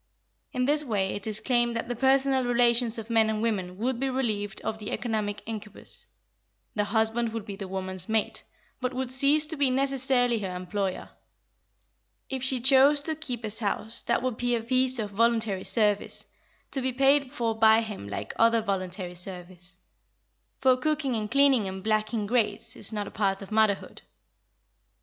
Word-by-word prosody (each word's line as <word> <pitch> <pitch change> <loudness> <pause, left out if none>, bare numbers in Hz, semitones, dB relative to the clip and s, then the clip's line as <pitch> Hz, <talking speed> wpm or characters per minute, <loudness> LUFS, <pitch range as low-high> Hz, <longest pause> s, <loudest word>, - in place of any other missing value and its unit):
In 250 0 0
this 295 +2 +1
way 205 -7 0
it 205 +1 -6
is 215 -1 -3
claimed 240 -2 +1
that 230 - -3
the 245 - -3
personal 265 +1 +3
relations 240 -1 +2
of 225 +1 -7
men 225 -1 +4
and 215 -1 -1
women 190 -5 -2
would 240 +3 -1
be 270 +1 0
relieved 215 -6 -2
of 220 - -4
the 210 - -5
economic 210 -3 -2
incubus: 215 -2 -8 0.7
the 210 -1 0
husband 220 +2 +1
would 225 -3 -4
be 205 -3 -6
the 195 -1 -7
woman's 185 0 -2
mate, 220 -1 -1 0.4
but 255 0 -3
would 260 -1 -2
cease 280 +3 +3
to 320 +1 -3
be 280 -3 +2
necessarily 260 -3 +1
her 190 -3 -4
employer. 185 +1 -3 1.2
If 265 -1 -2
she 260 -1 0
chose 275 +3 +6
to 315 +2 -2
keep 250 -7 -5
his 215 +1 -3
house, 220 +1 -3
that 235 - 0
would 255 -3 -1
be 245 0 +1
a 230 - -3
piece 255 +1 +1
of 210 -3 -3
voluntary 225 -2 +1
service, 210 -3 +1 0.5
to 270 - -2
be 260 0 0
paid 275 +1 +3
for 235 -5 -1
by 220 0 +6
him 210 - -6
like 100 - -5
other 230 0 +4
voluntary 185 -3 -3
service; 180 0 -8 0.8
for 260 -1 +4
cooking 280 -1 0
and 215 -1 -2
cleaning 270 -5 +4
and 190 0 -6
blacking 215 0 0
grates 225 0 0
is - - -1
not 210 -2 -3
a - - -9
part 195 -1 -1
of 195 - -12
motherhood. 215 -2 +1
225 Hz, 175 wpm, -27 LUFS, 205-255 Hz, 1.2 s, chose